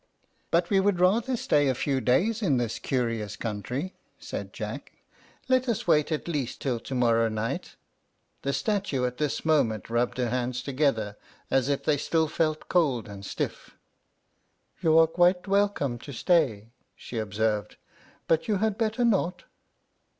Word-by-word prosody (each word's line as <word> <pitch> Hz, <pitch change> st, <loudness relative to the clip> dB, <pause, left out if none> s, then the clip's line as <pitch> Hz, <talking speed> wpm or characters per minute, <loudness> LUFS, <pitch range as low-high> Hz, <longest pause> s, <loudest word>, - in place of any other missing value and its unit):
"But 170 Hz, +2 st, +1 dB
we 195 Hz, -, +5 dB
would 190 Hz, -2 st, +2 dB
rather 225 Hz, +8 st, +3 dB
stay 145 Hz, -8 st, +2 dB
a 130 Hz, -, +1 dB
few 135 Hz, +1 st, 0 dB
days 195 Hz, -, +2 dB
in 150 Hz, -, +2 dB
this 115 Hz, -2 st, -2 dB
curious 115 Hz, -6 st, -2 dB
country," 125 Hz, -, -4 dB, 0.2 s
said -, -, -6 dB
Jack; -, -, -6 dB, 0.5 s
"let 255 Hz, -1 st, +2 dB
us 230 Hz, -, -1 dB
wait 150 Hz, -2 st, +3 dB
at 155 Hz, -, -2 dB
least 145 Hz, -7 st, -3 dB
till 125 Hz, -4 st, -1 dB
to 130 Hz, -, -6 dB
morrow 115 Hz, -2 st, +3 dB
night." 110 Hz, +1 st, -3 dB, 0.7 s
The 140 Hz, -, -1 dB
statue 150 Hz, -, 0 dB
at 125 Hz, 0 st, -3 dB
this 150 Hz, 0 st, -2 dB
moment 115 Hz, -, +1 dB
rubbed 120 Hz, +2 st, 0 dB
her 125 Hz, -2 st, 0 dB
hands 125 Hz, 0 st, -2 dB
together, 130 Hz, -7 st, 0 dB, 0.3 s
as 135 Hz, 0 st, +2 dB
if 140 Hz, -, 0 dB
they 150 Hz, -2 st, +2 dB
still 160 Hz, +3 st, +1 dB
felt 155 Hz, 0 st, -1 dB
cold 140 Hz, -, +1 dB
and 100 Hz, -1 st, -9 dB
stiff. -, -, -5 dB, 1.0 s
"You 160 Hz, -1 st, +4 dB
are 165 Hz, -, +8 dB
quite 175 Hz, +3 st, +2 dB
welcome 195 Hz, -11 st, +1 dB
to 140 Hz, -, -9 dB
stay," 120 Hz, -, +1 dB, 0.2 s
she 120 Hz, -, -6 dB
observed; 105 Hz, 0 st, -1 dB, 0.5 s
"but 165 Hz, -1 st, +2 dB
you 215 Hz, -, +2 dB
had 215 Hz, +1 st, 0 dB
better 225 Hz, +2 st, +1 dB
not." 195 Hz, -5 st, +1 dB
140 Hz, 155 wpm, -27 LUFS, 120-180 Hz, 1.0 s, are